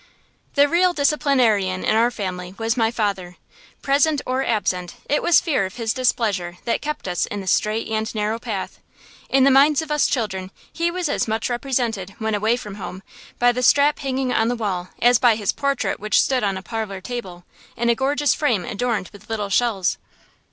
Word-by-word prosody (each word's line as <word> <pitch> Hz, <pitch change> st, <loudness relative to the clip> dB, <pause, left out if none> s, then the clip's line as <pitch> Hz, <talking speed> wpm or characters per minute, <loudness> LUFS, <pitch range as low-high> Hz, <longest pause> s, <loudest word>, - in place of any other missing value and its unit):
The 285 Hz, 0 st, +5 dB
real 355 Hz, +3 st, +3 dB
disciplinarian 255 Hz, -, +2 dB
in 215 Hz, -, +2 dB
our 230 Hz, +2 st, +4 dB
family 185 Hz, -5 st, -5 dB
was 225 Hz, +1 st, 0 dB
my 225 Hz, -3 st, +2 dB
father. 200 Hz, -6 st, -2 dB, 0.5 s
Present 290 Hz, +2 st, +2 dB
or 260 Hz, +1 st, 0 dB
absent, 185 Hz, -7 st, -1 dB
it 295 Hz, -, +1 dB
was 345 Hz, -, +5 dB
fear 310 Hz, -, 0 dB
of 185 Hz, -, -13 dB
his 230 Hz, -2 st, -1 dB
displeasure 205 Hz, -9 st, 0 dB
that 235 Hz, -, 0 dB
kept 300 Hz, -7 st, -4 dB
us 175 Hz, -2 st, -1 dB
in 205 Hz, -, -5 dB
the 195 Hz, -, -7 dB
straight 215 Hz, +4 st, 0 dB
and 220 Hz, 0 st, -2 dB
narrow 215 Hz, +2 st, -1 dB
path. 220 Hz, -5 st, -5 dB, 0.5 s
In 270 Hz, 0 st, +4 dB
the 275 Hz, -, +6 dB
minds 280 Hz, +2 st, +5 dB
of 310 Hz, -, -8 dB
us 300 Hz, -1 st, +3 dB
children 190 Hz, -7 st, -2 dB, 0.2 s
he 340 Hz, 0 st, 0 dB
was 355 Hz, -1 st, -2 dB
as 290 Hz, -, -1 dB
much 220 Hz, +2 st, -1 dB
represented, 240 Hz, -6 st, -2 dB
when 220 Hz, -1 st, -2 dB
away 215 Hz, +3 st, +1 dB
from 210 Hz, -4 st, -8 dB
home, 185 Hz, +1 st, -7 dB, 0.3 s
by 245 Hz, 0 st, +4 dB
the 250 Hz, +1 st, -3 dB
strap 285 Hz, +3 st, +4 dB
hanging 265 Hz, -2 st, -1 dB
on 225 Hz, -, +2 dB
the 245 Hz, -, 0 dB
wall 190 Hz, -6 st, -3 dB
as 245 Hz, -1 st, +5 dB
by 240 Hz, -3 st, +5 dB
his 210 Hz, -2 st, 0 dB
portrait 280 Hz, -2 st, -1 dB
which 215 Hz, +1 st, +2 dB
stood 260 Hz, -3 st, +1 dB
on 195 Hz, -2 st, 0 dB
a 190 Hz, -, -8 dB
parlor 220 Hz, -4 st, -4 dB
table, 185 Hz, -5 st, -7 dB, 0.3 s
in 235 Hz, -, 0 dB
a 235 Hz, -, +5 dB
gorgeous 280 Hz, +4 st, +1 dB
frame 235 Hz, -, 0 dB
adorned 220 Hz, -4 st, -2 dB
with 205 Hz, -, -15 dB
little 210 Hz, -3 st, -2 dB
shells. 200 Hz, -5 st, +1 dB
230 Hz, 195 wpm, -22 LUFS, 200-270 Hz, 0.5 s, the